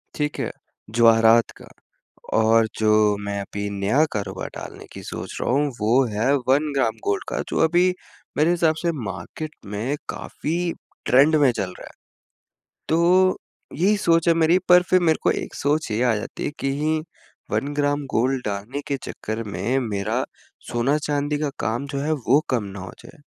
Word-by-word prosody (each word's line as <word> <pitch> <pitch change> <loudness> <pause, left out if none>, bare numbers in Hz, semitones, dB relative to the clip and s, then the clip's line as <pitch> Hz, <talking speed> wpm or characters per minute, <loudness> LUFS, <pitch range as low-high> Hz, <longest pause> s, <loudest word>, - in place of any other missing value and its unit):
ठीक 150 0 -2
है? - - -2 0.4
जवाहरात 115 0 +5
का। - - -12 0.7
और 110 0 +4
जो 105 -1 +3
मैं 100 0 -3
अभी 100 +1 -5
नया 100 +9 +2
कारोबार 105 -2 -4
डालने - - -8
की - - -8
सोच - - -6
रहा - - -1
हूँ, 145 +3 +2
वो 120 +5 +4
है 115 +7 +2
1 145 +3 +3
ग्राम 135 - +1
गोल्ड 405 -1 0
का, - - -2
जो - - -2
अभी 175 +3 +3 0.4
मेरे 155 +3 +4
हिसाब 165 -2 +2
से 170 -1 +1
मार्केट 105 - -6
में 105 +8 -2
काफ़ी 170 +2 -3 0.3
ट्रेंड 140 +5 +5
में 145 -4 +5
चल 95 -5 -4
रहा - - -9
है। - - -12 1.0
तो 180 +3 +4 0.4
यही 195 +7 +2
सोच 165 -3 +2
है 170 - +6
मेरी, 165 +1 +4
पर 180 0 +8
फ़िर 185 0 +3
मेरे 160 -2 +3
को - - +4
एक - - -4
सोच 145 -4 0
ये 110 - 0
आ 120 -3 +3
जाती 105 - -5
है, - - -2
कहीं 150 +3 0 0.5
1 145 +1 -1
ग्राम 145 0 0
गोल्ड 130 +3 +1
डालने 105 +8 -4
के 140 - -1
चक्कर 110 +1 -5
में 105 +6 -1
मेरा 105 +4 -1 0.5
सोना-चांदी 145 +3 0
का 150 -1 -1
काम 120 +6 -1
जो 140 -1 -3
है, 150 +3 -1
वो 140 -1 +3
कम 120 -4 +1
ना 100 -1 -8
हो 95 - -7
जाए। 170 - -15
140 Hz, 175 wpm, -23 LUFS, 110-155 Hz, 1.0 s, पर